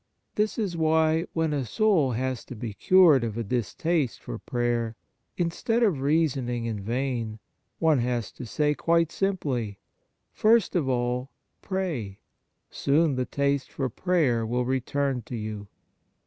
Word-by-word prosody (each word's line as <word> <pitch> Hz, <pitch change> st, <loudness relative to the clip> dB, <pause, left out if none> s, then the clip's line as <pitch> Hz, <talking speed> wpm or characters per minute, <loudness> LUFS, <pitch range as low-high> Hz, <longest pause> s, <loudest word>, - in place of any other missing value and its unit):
This 210 Hz, 0 st, 0 dB
is 200 Hz, -6 st, -1 dB
why, 160 Hz, +1 st, +2 dB
when 160 Hz, -2 st, 0 dB
a 140 Hz, -2 st, 0 dB
soul 155 Hz, -, +2 dB
has 130 Hz, +1 st, -2 dB
to 125 Hz, -, -8 dB
be 110 Hz, -1 st, -5 dB
cured 165 Hz, -, +5 dB
of 115 Hz, -1 st, -3 dB
a 115 Hz, -, -1 dB
distaste 125 Hz, -, -1 dB
for -, -, -7 dB
prayer, 120 Hz, -2 st, -1 dB, 0.4 s
instead 205 Hz, +7 st, 0 dB
of 180 Hz, -12 st, +2 dB
reasoning 135 Hz, -5 st, +1 dB
in 110 Hz, -3 st, -3 dB
vain, 115 Hz, 0 st, -2 dB, 0.4 s
one 160 Hz, -4 st, +3 dB
has 120 Hz, -1 st, -1 dB
to 125 Hz, -, -9 dB
say 150 Hz, +6 st, +1 dB
quite 165 Hz, +1 st, +2 dB
simply: 135 Hz, -, -1 dB, 0.3 s
" -, -, -50 dB
First 220 Hz, -3 st, +3 dB
of 150 Hz, -7 st, +1 dB
all, 125 Hz, +1 st, -1 dB, 0.3 s
pray; 160 Hz, -, -3 dB, 0.5 s
soon 150 Hz, +2 st, +2 dB
the 130 Hz, -1 st, -1 dB
taste 140 Hz, -1 st, -1 dB
for 135 Hz, -2 st, -2 dB
prayer 150 Hz, -9 st, +1 dB
will 120 Hz, +2 st, -1 dB
return 130 Hz, +1 st, -1 dB
to 125 Hz, -, -5 dB
you." 105 Hz, -2 st, -5 dB
135 Hz, 150 wpm, -26 LUFS, 120-165 Hz, 0.5 s, cured